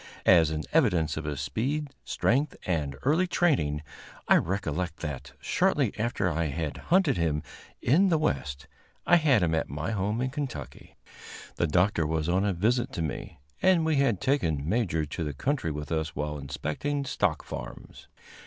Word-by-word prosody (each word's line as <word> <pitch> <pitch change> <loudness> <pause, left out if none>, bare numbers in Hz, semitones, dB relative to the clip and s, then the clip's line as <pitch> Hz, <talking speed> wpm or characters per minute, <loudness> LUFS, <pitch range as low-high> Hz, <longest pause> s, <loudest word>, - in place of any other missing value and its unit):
As 80 -3 +6
an 80 0 -3
evidence 90 - +3
of 80 - -5
his 75 -3 -3
speed, 145 +6 -2
strength 140 +4 +1
and 75 -6 -1
early 160 +7 +3
training, 80 - +1 0.4
I - - +7
recollect 90 -2 -2
that, 70 -3 -5
shortly 145 - +1
after 110 -3 -1
I 85 -1 0
had 75 0 -3
hunted 170 -6 +4
him 80 -3 0 0.4
in 180 +10 +4
the 165 - +3
West, 70 - -2 0.4
I 175 - +6
had 140 - +3
him 80 -2 +1
at 80 - 0
my 75 +7 -3
home 105 +2 -1
in 130 +1 -1
Kentucky. 140 -1 -6 0.6
The 85 - +2
Doctor 90 0 +2
was 80 0 -1
on 90 +3 +2
a 100 - +2
visit 120 +8 +1
to 85 - -2
me, 75 - -5 0.2
and 180 -4 +4
we 160 -2 +2
had 135 -9 +2
taken 80 - 0
Major 85 -7 0
to 75 +3 -4
the 75 -2 -3
country 130 - -1
with 75 0 -5
us 80 -1 -1
while 75 0 -3
inspecting 75 - -3
stock 90 - 0
farms. - - -9
90 Hz, 170 wpm, -28 LUFS, -, 0.6 s, I